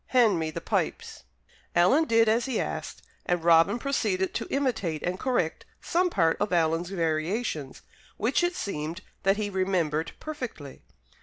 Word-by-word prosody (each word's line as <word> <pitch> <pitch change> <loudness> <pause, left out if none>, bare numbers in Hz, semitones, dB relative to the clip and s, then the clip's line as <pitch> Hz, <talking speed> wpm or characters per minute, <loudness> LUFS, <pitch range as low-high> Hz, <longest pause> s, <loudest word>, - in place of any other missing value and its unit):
Hand 230 -8 +4
me 160 -1 -1
the 155 - -6
pipes." - - -2 0.5
Alan 260 - +5
did 230 -4 +4
as 225 +2 +2
he 260 -4 -1
asked; - - -4 0.2
and 175 -2 0
Robin 165 +5 +5
proceeded 215 -8 -1
to - - -3
imitate 220 - -1
and 185 +1 -2
correct 245 -11 -1 0.2
some 360 +2 +1
part 165 - +2
of 205 -1 -1
Alan's 165 0 +1
variations, 165 - -2 0.3
which 245 +10 +1
it 350 0 +1
seemed 165 - -4 0.2
that 195 +1 +2
he 210 -1 -1
remembered 170 -5 0
perfectly. 250 - -7
190 Hz, 150 wpm, -27 LUFS, 165-240 Hz, 0.5 s, Alan